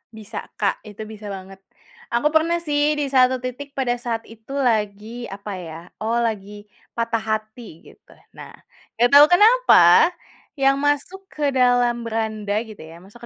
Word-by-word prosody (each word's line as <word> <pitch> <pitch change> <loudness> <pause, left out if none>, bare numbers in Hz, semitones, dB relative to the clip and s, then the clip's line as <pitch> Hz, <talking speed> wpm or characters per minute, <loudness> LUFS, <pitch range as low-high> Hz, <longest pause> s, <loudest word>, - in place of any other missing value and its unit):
Bisa, 215 -2 -8
Kak, - - -1
itu 210 +1 -9
bisa 215 -1 -10
banget. 195 -1 -9 0.5
Aku 265 +6 0
pernah 320 +2 +2
sih 295 -1 +1
di 285 -2 -3
satu 255 -1 +3
titik 275 +3 -7
pada 260 -3 -1
saat 230 -2 -3
itu 225 +4 -11
lagi, 225 -2 -2
apa 200 +1 -8
ya, 165 -3 -8 0.2
oh 225 +2 -1
lagi 205 -2 -4 0.3
patah 230 -1 -1
hati 215 -4 -6
gitu. - - -24 0.2
Nah, - - -12 0.4
enggak 240 +2 +3
tahu 285 +1 +9
kenapa 355 - +6 0.5
yang 275 -1 +2
masuk 290 +7 -2
ke 295 -5 -2
dalam 245 -2 +2
beranda 220 -2 -3
gitu 220 -3 -13
ya, 160 +1 -11
masuk 205 +5 -17
235 Hz, 155 wpm, -21 LUFS, 215-275 Hz, 0.5 s, tahu